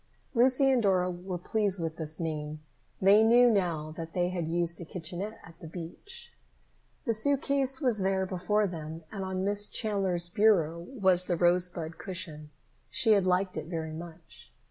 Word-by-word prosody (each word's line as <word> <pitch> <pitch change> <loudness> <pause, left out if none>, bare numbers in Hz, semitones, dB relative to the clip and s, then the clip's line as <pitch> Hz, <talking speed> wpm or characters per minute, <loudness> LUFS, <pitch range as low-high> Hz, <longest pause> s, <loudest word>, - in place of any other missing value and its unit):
Lucy 260 +2 +4
and 255 -2 +2
Dora 185 -3 +2
were 180 +1 -6
pleased 200 +1 -1
with 165 -1 -4
this 155 -1 -5
name. 155 -2 -4 0.4
They 200 +3 +6
knew 240 +2 +5
now 170 -7 -1
that 165 -1 -7
they 175 -1 0
had 175 -3 -3
used 170 +1 -1
a - - -5
kitchenette 180 +6 -6
at 165 0 -15
the 165 - -11
beach. 175 - -10 0.7
The 230 - +1
suit 275 +5 +2
case 270 -1 +1
was 245 -6 +3
there 190 0 0
before 190 +3 0
them 160 -3 -6
and 195 -2 -5
on 190 0 -3
Miss 205 +1 +2
Chandler's 195 -5 0
bureau 175 -5 +2
was 185 -3 +1
the 175 -2 -1
rosebud 175 -1 +3
cushion. 160 -5 -5 0.4
She 225 - +3
had 200 -3 +4
liked 185 +1 0
it - - -5
very 160 -2 -5
much. 165 - -11
180 Hz, 170 wpm, -29 LUFS, 165-210 Hz, 0.7 s, They